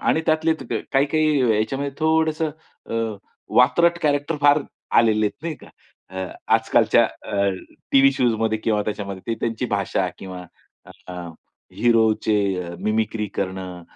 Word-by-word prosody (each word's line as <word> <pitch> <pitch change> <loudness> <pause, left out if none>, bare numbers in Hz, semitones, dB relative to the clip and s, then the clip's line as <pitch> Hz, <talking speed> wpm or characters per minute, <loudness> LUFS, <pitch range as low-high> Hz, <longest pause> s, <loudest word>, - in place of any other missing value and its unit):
आणि 160 - +2
त्यातले 160 +1 +3 0.4
काही, 135 0 +4
काही 155 -1 +2 0.2
याच्यामध्ये 135 +6 -2
थोडंसं 160 0 +1 0.4
अ, - - -3 0.6
वातरतट 170 +7 +4
कॅरेक्टर 145 +1 +1
फार 145 +1 +5 0.4
आलेले 110 -2 +3
आहेत 105 - -7
नाही 165 -1 -3
का. - - -16 0.4
अ, 95 0 -5 0.3
आजकालच्या - - +4
अ, 100 0 -2 0.4
टीव्ही 135 0 +6
शोज 125 -3 +1
मध्ये 110 -1 +1
किंवा 110 -1 0
त्याच्यामध्ये, 100 -3 -5
ते 115 - 0
त्यांची 115 +2 -2
भाषा 100 -3 -1
किंवा 95 -1 -8 0.6
अ, 90 - -8 0.6
हीरोचे 110 -2 +2 0.2
अ, 85 0 -7
मिमिक्री 110 0 -1
करणं 95 -2 -4
115 Hz, 135 wpm, -22 LUFS, 105-145 Hz, 0.6 s, टीव्ही